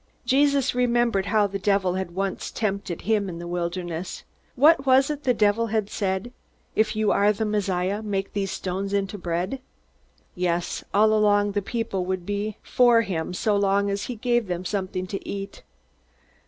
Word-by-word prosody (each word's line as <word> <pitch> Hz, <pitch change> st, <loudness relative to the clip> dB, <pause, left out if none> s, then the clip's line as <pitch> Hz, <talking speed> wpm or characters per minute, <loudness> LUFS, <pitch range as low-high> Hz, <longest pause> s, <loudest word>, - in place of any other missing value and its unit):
Jesus 280 Hz, +1 st, +3 dB
remembered 240 Hz, -5 st, +1 dB
how 215 Hz, -1 st, +3 dB
the 195 Hz, 0 st, -3 dB
devil 195 Hz, -2 st, +1 dB
had 185 Hz, -2 st, -4 dB
once 195 Hz, 0 st, -2 dB
tempted 200 Hz, -5 st, -3 dB
him 210 Hz, -3 st, +1 dB
in 170 Hz, -, -6 dB
the 170 Hz, -, -7 dB
wilderness. 175 Hz, 0 st, -4 dB, 0.3 s
What 290 Hz, +2 st, +5 dB
was 265 Hz, +2 st, +5 dB
it 300 Hz, -, -2 dB
that -, -, -32 dB
the 250 Hz, -, +4 dB
devil 215 Hz, +2 st, +2 dB
had 215 Hz, -2 st, -1 dB
said? 195 Hz, +4 st, -2 dB, 0.4 s
"If 215 Hz, 0 st, +2 dB
you 215 Hz, -1 st, +2 dB
are 205 Hz, +1 st, +4 dB
the 215 Hz, +1 st, -2 dB
Messiah, 200 Hz, -1 st, -1 dB
make 195 Hz, -2 st, -3 dB
these 200 Hz, -2 st, -1 dB
stones 195 Hz, +2 st, -3 dB
into 200 Hz, 0 st, -1 dB
bread." 180 Hz, +9 st, -2 dB, 0.7 s
Yes, 175 Hz, -1 st, -1 dB
all 210 Hz, -1 st, +4 dB
the 205 Hz, 0 st, -1 dB
people 200 Hz, -3 st, -2 dB
would 185 Hz, -1 st, -3 dB
be 205 Hz, +1 st, -3 dB
for 240 Hz, -2 st, +4 dB
him 170 Hz, -6 st, -3 dB
so 210 Hz, +3 st, +1 dB
long 200 Hz, 0 st, +2 dB
as 200 Hz, 0 st, -2 dB
he 250 Hz, -, -5 dB
gave 240 Hz, -1 st, 0 dB
them 180 Hz, 0 st, -3 dB
something 185 Hz, -2 st, -2 dB
to 195 Hz, +2 st, -5 dB
eat. 195 Hz, 0 st, -6 dB
200 Hz, 170 wpm, -25 LUFS, 190-220 Hz, 0.7 s, What